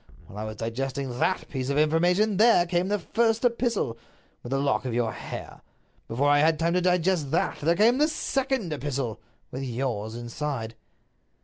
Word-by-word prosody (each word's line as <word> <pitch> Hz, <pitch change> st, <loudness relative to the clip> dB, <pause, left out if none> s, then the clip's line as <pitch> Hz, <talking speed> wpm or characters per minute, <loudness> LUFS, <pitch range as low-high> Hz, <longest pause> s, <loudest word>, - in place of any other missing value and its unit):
While 105 Hz, -, -10 dB
I 110 Hz, -, -3 dB
was 110 Hz, 0 st, -6 dB
digesting 130 Hz, +3 st, -3 dB
that 185 Hz, -, 0 dB
piece 130 Hz, -2 st, -4 dB
of 140 Hz, -, 0 dB
information 175 Hz, +7 st, +3 dB
there 220 Hz, -5 st, +5 dB
came 175 Hz, +1 st, 0 dB
the 205 Hz, +1 st, +1 dB
first 225 Hz, +5 st, +1 dB
epistle, 235 Hz, -, 0 dB, 0.4 s
with 120 Hz, -, -8 dB
the 135 Hz, -, 0 dB
lock 140 Hz, 0 st, +1 dB
of 125 Hz, -3 st, -3 dB
your 120 Hz, -2 st, +1 dB
hair. -, -, -8 dB, 0.5 s
Before 130 Hz, +5 st, 0 dB
I 145 Hz, 0 st, +5 dB
had 160 Hz, +1 st, +3 dB
time 165 Hz, +2 st, +1 dB
to 180 Hz, -, +2 dB
digest 180 Hz, -4 st, +1 dB
that -, -, 0 dB
there 165 Hz, +3 st, +2 dB
came 230 Hz, +7 st, +4 dB
the 300 Hz, -, +4 dB
second 265 Hz, -, -1 dB
epistle, 135 Hz, -6 st, -3 dB, 0.3 s
with 130 Hz, -, -5 dB
yours 120 Hz, -4 st, -3 dB
inside." 120 Hz, 0 st, -4 dB
150 Hz, 180 wpm, -26 LUFS, 125-185 Hz, 0.5 s, there